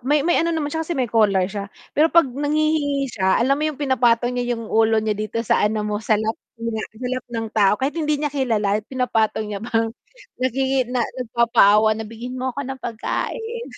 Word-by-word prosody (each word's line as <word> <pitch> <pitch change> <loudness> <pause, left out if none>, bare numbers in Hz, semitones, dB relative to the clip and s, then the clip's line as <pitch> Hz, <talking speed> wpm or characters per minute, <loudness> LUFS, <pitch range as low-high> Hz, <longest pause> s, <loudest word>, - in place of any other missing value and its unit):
may 285 +3 +1
may 345 +1 +3
ano 335 - 0
naman 315 -3 -2
siya 320 - -1
kasi 325 +1 -3
may 260 - +1
collar 205 -5 +3
siya. 200 +1 -5 0.2
Pero 310 +3 +4
'pag 335 0 +5
nanghihingi 290 +1 0
siya, 190 -2 +2
alam 255 +4 +2
mo - - -1
'yong 305 - -5
pinapatong 245 -3 +2
niya 245 -1 -1
'yong 230 - -7
ulo 225 0 +2
niya 215 0 +1
dito 215 +2 -5
sa - - +2
ano 210 0 +1
mo, 210 0 -2
sa 220 -1 +2
lap, 220 +1 -1 0.2
'yon 230 0 -4
nga, 220 0 -3
sa 250 +2 -5
lap 255 0 -3
ng 230 -1 -3
tao. 205 -3 +4
Kahit 265 +4 -1
hindi 300 -1 +1
niya 295 -1 -2
kilala 215 -7 +1
pinapatong 235 -4 0
niya 200 - -4
parang 225 0 -1 0.5
nakiki 260 0 0
na 250 -2 0
nagpapaawa 230 -4 +3
na, 220 +1 -4
"Bigyan 240 +3 -7
mo 260 - -1
ako 280 - -3
ng 265 0 -6
pagkain." 455 - -4
245 Hz, 215 wpm, -22 LUFS, 220-280 Hz, 0.5 s, pag